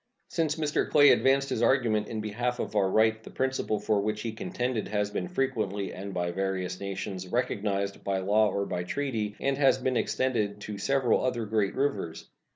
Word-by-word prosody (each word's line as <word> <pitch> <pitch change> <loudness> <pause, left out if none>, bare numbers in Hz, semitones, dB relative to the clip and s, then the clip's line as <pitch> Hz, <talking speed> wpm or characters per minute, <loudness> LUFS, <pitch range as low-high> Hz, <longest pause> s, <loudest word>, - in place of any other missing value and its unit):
Since 160 -3 0
Mr. 155 -2 0
Clay 145 -1 +7
advanced 135 +1 +3
his 110 - -1
argument 115 -4 +2
in 110 -1 -4
behalf 120 +4 -2
of - - -4
our 100 -2 +3
right 110 +2 +3
the - - -10
principle 130 -5 -1
for 105 -2 +1
which 105 +1 -2
he 115 - -2
contended 120 +1 -2
has 105 -1 -1
been 180 - -2
frequently, 110 - -2
and 100 +2 -6
by 90 -2 -1
various 95 -1 -2
nations, 95 -1 -5
recognized 100 -3 -1
by 100 -1 0
law 105 +3 +3
or 100 0 -1
by 90 - -3
treaty, 110 -2 -2
and 140 0 0
has 135 -2 +5
been 130 -2 0
extended 110 -7 0
to 105 -1 -6
several 130 +2 +2
other 125 -3 -1
great 105 -2 0
rivers. 135 - -2
110 Hz, 185 wpm, -28 LUFS, 100-130 Hz, -, Clay